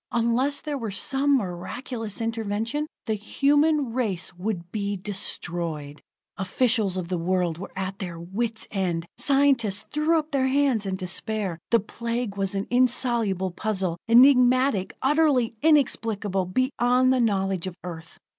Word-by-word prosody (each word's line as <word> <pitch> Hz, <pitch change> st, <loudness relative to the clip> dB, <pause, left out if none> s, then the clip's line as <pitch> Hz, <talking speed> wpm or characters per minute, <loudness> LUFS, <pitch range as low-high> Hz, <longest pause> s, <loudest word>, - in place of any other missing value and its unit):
Unless 240 Hz, +5 st, +1 dB
there 295 Hz, -2 st, -4 dB
were 225 Hz, -3 st, -3 dB
some 275 Hz, +7 st, +2 dB
miraculous 220 Hz, +3 st, -5 dB
intervention, 225 Hz, +5 st, -2 dB, 0.2 s
the 220 Hz, -, 0 dB
human 285 Hz, +5 st, +1 dB
race 200 Hz, -9 st, -2 dB
would 180 Hz, -1 st, -4 dB
be 205 Hz, -2 st, -2 dB
destroyed! 170 Hz, -6 st, -3 dB, 0.4 s
Officials 210 Hz, 0 st, +1 dB
of 180 Hz, -2 st, -3 dB
the 180 Hz, -1 st, -2 dB
world 175 Hz, -1 st, 0 dB
were 195 Hz, -, -7 dB
at 190 Hz, +1 st, -4 dB
their 175 Hz, -4 st, -5 dB
wits' 215 Hz, +6 st, -3 dB
end; 175 Hz, -4 st, -1 dB
scientists 270 Hz, -8 st, +2 dB
threw 305 Hz, +2 st, +2 dB
up 310 Hz, 0 st, -3 dB
their 265 Hz, -2 st, +1 dB
hands 265 Hz, -6 st, +1 dB
in 190 Hz, -, -1 dB
despair. 190 Hz, 0 st, -2 dB
The 230 Hz, -, +4 dB
Plague 230 Hz, 0 st, -4 dB
was 195 Hz, 0 st, -1 dB
an 195 Hz, +1 st, -1 dB
insoluble 235 Hz, -6 st, +2 dB
puzzle 185 Hz, -3 st, -2 dB
enigmatical, 250 Hz, -3 st, +5 dB
utterly 275 Hz, -5 st, +3 dB
inexplicable, 220 Hz, -, +1 dB
beyond 255 Hz, +3 st, +2 dB
the 255 Hz, -, +2 dB
knowledge 195 Hz, -4 st, 0 dB
of 180 Hz, -, -6 dB
Earth. 165 Hz, -2 st, -8 dB
220 Hz, 135 wpm, -25 LUFS, 190-255 Hz, 0.4 s, enigmatical